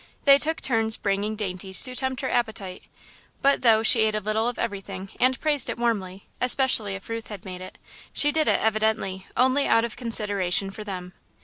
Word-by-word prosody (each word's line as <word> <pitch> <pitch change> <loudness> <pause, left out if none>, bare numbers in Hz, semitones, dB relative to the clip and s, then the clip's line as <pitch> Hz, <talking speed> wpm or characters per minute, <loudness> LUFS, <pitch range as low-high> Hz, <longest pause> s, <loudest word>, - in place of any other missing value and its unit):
They 280 0 +6
took 320 +2 0
turns 225 -3 +1
bringing 205 +2 -2
dainties 190 -2 +1
to 255 -1 -2
tempt 260 0 -1
her 265 - -3
appetite, 210 -6 -2 0.6
but, 280 0 +3
though 225 -3 +4
she 225 - +6
ate 220 -1 +2
a - - 0
little 215 +2 -1
of 245 - -3
everything 195 -3 -5
and 255 +1 +2
praised 295 -4 +1
it - - -4
warmly, 200 -5 -2 0.2
especially 250 -5 +2
if 195 - -11
Ruth 230 -1 -6
had 205 -4 -9
made 185 -1 -8
it, 185 - -10 0.3
she 295 - +4
did 310 0 +1
it, - - +3
evidently, 215 -3 -1
only 260 +3 +2
out 230 0 +3
of 235 - -7
consideration 205 -5 0
for 215 +2 -8
them. 180 -3 -7
220 Hz, 195 wpm, -24 LUFS, 195-250 Hz, 0.6 s, They